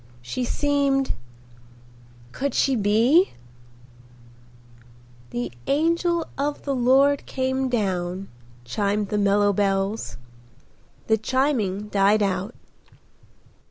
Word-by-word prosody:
She 120 - -3
seemed—! 280 0 +1 1.2
Could 280 - -3
she 270 - +2
be—? 230 - +3 2.0
"The 120 0 -4 0.2
angel 335 +3 +1
of 290 +1 -2
the 280 - -1
Lord 270 +3 +3
came 260 0 -1
down,"—chimed 185 - -3
the 210 - 0
mellow 205 0 +3
bells. 195 +2 -1 0.9
The 220 -1 +2
chiming 215 -6 0
died 205 +1 +3
out. 195 +3 -2
215 Hz, 85 wpm, -24 LUFS, 195-275 Hz, 2.0 s, be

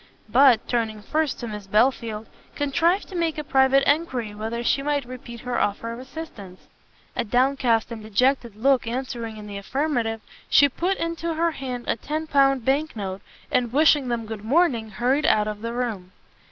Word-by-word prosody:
But, 255 0 +5
turning 220 -3 -1
first 310 +1 -1
to 240 - -4
Miss 210 -2 -7
Belfield, 220 0 +1 0.3
contrived 335 +7 +1
to 380 - -8
make 335 -3 0
a 300 - -3
private 270 0 +4
enquiry 260 -8 0
whether 225 +3 -4
she 275 - +2
might 285 -1 -1
repeat 240 -1 -9
her 250 -1 -2
offer 215 +3 -1
of 235 - -8
assistance. 255 - -9 0.5
A - - 0
downcast 245 -1 +1
and 225 -2 -6
dejected 235 +2 +1
look 255 +2 +2
answering 235 -2 -4
in 210 - -9
the 200 -1 -6
affirmative, 240 -2 -1 0.3
she 285 - +6
put 360 +8 -1
into 335 0 -3
her 335 +1 +1
hand 255 -4 -5
a - - 0
ten 310 +7 -3
pound 275 -4 +3
bank 285 +3 +1
note, 195 -2 -5 0.3
and 240 -2 +1
wishing 295 -1 +4
them 235 -2 -2
good 215 -1 -7
morning, 245 -3 +2
hurried 250 +8 +1
out 210 0 +3
of 210 -1 -5
the 230 +1 -3
room. 225 -7 -3
245 Hz, 180 wpm, -24 LUFS, 220-285 Hz, 0.5 s, she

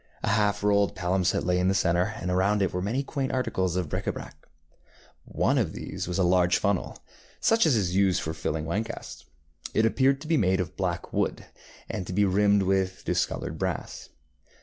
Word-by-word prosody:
A - - 0
half 105 -1 +1
rolled 100 -1 +2
palimpsest 90 0 0
lay 90 0 +2
in 90 - +2
the 95 - +2
centre, 95 +3 +1
and 90 - -3
around 100 +3 +2
it 95 - -1
were 90 - -1
many 115 +9 -1
quaint 135 -2 -3
articles 105 -9 -1
of 90 -3 -1
bric - - -4
├Ā - - 0
brac. - - -8 0.9
One - - +1
of - - -1
these - - -5
was 90 - -2
a 95 - +2
large 90 0 +3
funnel, 100 -3 -1 0.4
such 225 -5 +3
as 145 - +3
is 95 -5 0
used 95 -2 +3
for 80 - -3
filling 80 0 -3
wine 95 +7 -1
casks. 115 +1 -9 0.5
It 110 - +4
appeared 135 +4 +2
to 155 - -8
be 165 -1 +2
made 95 -5 +2
of 90 -3 -3
black 90 -2 -3
wood, - - -1 0.4
and 90 - -5
to - - -4
be 100 +2 +3
rimmed 100 +1 +3
with 95 -1 0
discoloured - - -2
brass. - - -4
95 Hz, 200 wpm, -27 LUFS, 90-105 Hz, 0.9 s, It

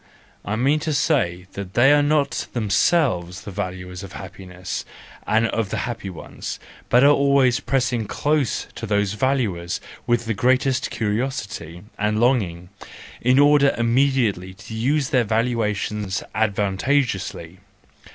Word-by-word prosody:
I 105 - -2
mean 135 +7 +2
to 155 0 -2
say 95 - +1
that 100 -1 -7
they 135 +4 +6
are 145 - +5
not 145 0 +1
themselves 100 - +1
the 100 - -8
valuers 90 0 -5
of 95 -1 -10
happiness 90 -1 -7 0.4
and 110 +1 +3
of 115 -4 -1
the - - -3
happy 115 -5 -5
ones, 90 - -7 0.3
but 125 - +5
they - - +6
always 140 -3 +4
press 125 -2 0
close 150 -4 0
to 115 - -6
these 100 -1 +1
valuers 105 -8 -1 0.3
with 120 -1 +1
the 115 - -1
greatest 130 +4 +1
curiosity 105 - -3 0.2
and 105 +1 +1
longing, 95 -9 +1 0.5
in 125 +2 +3
order 145 0 +5
immediately 115 -6 +1
to 110 - -11
use 135 +5 0
their 125 -2 +3
valuations 105 -3 -1
advantageously. 100 - -1
115 Hz, 130 wpm, -22 LUFS, 95-135 Hz, 0.5 s, they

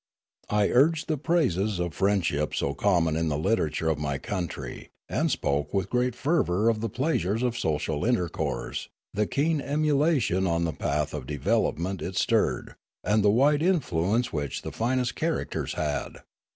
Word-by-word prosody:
I 105 -1 +2
urged 150 +5 +3
the 155 - 0
praises 110 - +1
of 85 -2 -2
friend 100 -2 +1
ship 75 -2 -1
so 70 - 0
common 85 -2 +2
in 80 0 0
the 75 -2 0
literature 80 -3 0
of 80 -2 +1
my 70 -2 -1
country, 90 +2 -5 0.2
and - - 0
spoke 70 +3 -1
with 95 -1 -1
great 125 -1 +1
fervour 115 - +2
of 110 -2 0
the 115 - -1
pleasures 115 - 0
of 120 -2 0
social 75 -7 -1
inter 115 -7 +2
course, - - -4 0.2
the 105 +1 0
keen 155 +1 +1
emulation 145 - +1
on 85 0 +1
the 80 -2 -1
path 75 +1 -1
of 70 -4 -5
development 85 +5 0
it 95 - -4
stirred, - - +1 0.3
and 105 0 +2
the 105 - +5
wide 140 +7 +4
influence 120 - +1
which 70 -3 -3
the - - -5
finest 125 +1 0
char 165 0 -1
acters - - -4
had. 75 -1 -3
100 Hz, 170 wpm, -27 LUFS, 80-125 Hz, 0.3 s, the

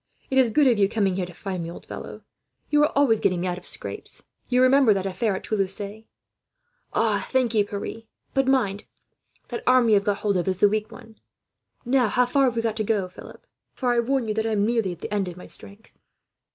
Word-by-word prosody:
"It 265 - +4
is 255 -3 +4
good 290 +6 +3
of 240 -5 +4
you 195 -1 +4
coming 200 -4 0
here 180 -2 -2
to 180 - -11
find 190 -2 -4
me, 165 - -5
old 170 - -10
fellow. - - -8 0.5
You 295 0 +4
are 300 - +3
always 265 -6 +4
getting 180 -1 +1
me - - -2
out 180 0 -2
of 180 - -9
scrapes. - - -6 0.3
You 250 0 +4
remember 255 -4 +5
that 190 -1 -2
affair 195 +2 -1
at - - -6
Toulouse. 195 -3 -1 1.1
"Thank 255 -3 +1
you, 210 -2 +4
Pierre, 205 +2 -6 0.3
but 270 -1 +1
mind, 210 -7 +1 0.6
that 240 - -4
arm 250 -2 +5
you - - +5
have 200 -1 +4
got 205 -1 0
hold 200 -3 0
of 175 - -2
is 185 -1 0
the 205 - +5
weak 215 +2 -2
one. 220 -1 -14 0.7
"Now, 250 -1 +3
how 250 +4 +2
far 270 +3 +2
have 245 -2 0
we 230 - -1
got 220 -1 -1
to 215 - 0
go, 200 -4 0
Philip? - - -13 0.3
For 250 -1 0
I 240 - +2
warn 255 0 0
you, 215 - 0
I - - -2
am 210 -2 +1
nearly 225 -4 0
at 175 - -9
the - - -5
end 200 -2 0
of 175 -1 -7
my 180 - -10
strength." 205 +2 -9
215 Hz, 230 wpm, -24 LUFS, 195-245 Hz, 1.1 s, remember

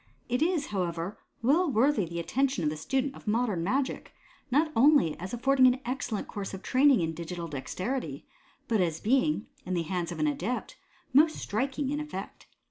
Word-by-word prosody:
It 250 +3 0
is, 325 -3 +1
however, 175 0 -2 0.2
well 315 +8 +3
worthy 240 -3 +3
the 170 +1 -5
attention 265 +3 0
of 150 - +1
the - - -4
student 265 - -1
of - - -14
modem 210 -5 +1
magic, 260 +8 -1 0.4
not 300 +5 +2
only 265 - +5
as 185 +2 -6
affording 260 +2 +4
an 250 +1 +3
excellent 245 -4 -3
course 195 -1 -5
of 190 - -10
training 265 -3 +4
in 165 -1 -1
digital 170 +1 -5
dexterity, 185 - -4 0.4
but 220 -4 +2
as 165 -3 0
being, 265 +1 +2 0.2
in 185 - -2
the 170 - 0
hands 175 0 -3
of - - -5
an 310 - +1
adept, 280 -4 -2 0.4
most 310 +4 +5
striking 265 +5 -2
in 295 - -1
effect. 300 -11 -7
240 Hz, 180 wpm, -29 LUFS, 180-275 Hz, 0.4 s, only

